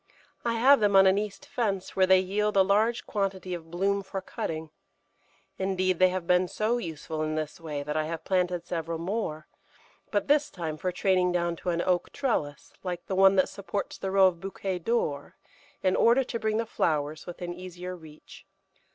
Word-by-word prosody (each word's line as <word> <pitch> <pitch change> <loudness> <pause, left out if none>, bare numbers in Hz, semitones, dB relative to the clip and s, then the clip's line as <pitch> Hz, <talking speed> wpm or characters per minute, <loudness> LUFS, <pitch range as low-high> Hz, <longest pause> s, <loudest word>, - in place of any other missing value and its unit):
I 235 - 0
have 270 +5 +6
them 205 -2 +3
on 195 0 +8
an 190 +1 +4
east 210 -1 -5
fence, 200 -6 -2
where 190 -1 +4
they 190 0 +7
yield 205 +2 0
a 190 - +7
large 215 +5 +2
quantity 195 -3 -2
of 165 -2 -7
bloom 195 +4 0
for 195 0 -5
cutting; 160 -4 -5 0.9
indeed, 185 -1 0
they 185 0 +6
have 180 -1 -3
been 180 +1 +3
so 220 +6 0
useful 160 -4 -5
in 155 0 -1
this 155 +1 -4
way 150 -3 -4
that 150 +1 -4
I 155 0 +1
have 165 0 -5
planted 180 -2 0
several 165 -1 -3
more, 165 -3 -3 0.6
but 205 - 0
this 290 0 +3
time 160 -4 -5
for 185 +3 -2
training 180 -1 +2
down 170 -1 0
to 180 - -4
an 170 0 0
oak 180 -1 0
trellis, 150 - -2
like 180 -2 -5
the - - -4
one 195 +1 +6
that 185 - +4
supports 200 +1 -5
the 190 - -3
row 195 0 +5
of 180 -2 +2
Bouquet 190 0 -4
d'Or, 165 -8 -1 0.5
in 185 -1 +3
order 240 +3 +4
to 235 -2 -4
bring 220 0 0
the 230 - 0
flowers 155 -6 -1
within 175 0 -5
easier 180 0 -7
reach. 155 -3 -14
185 Hz, 195 wpm, -28 LUFS, 170-200 Hz, 0.9 s, on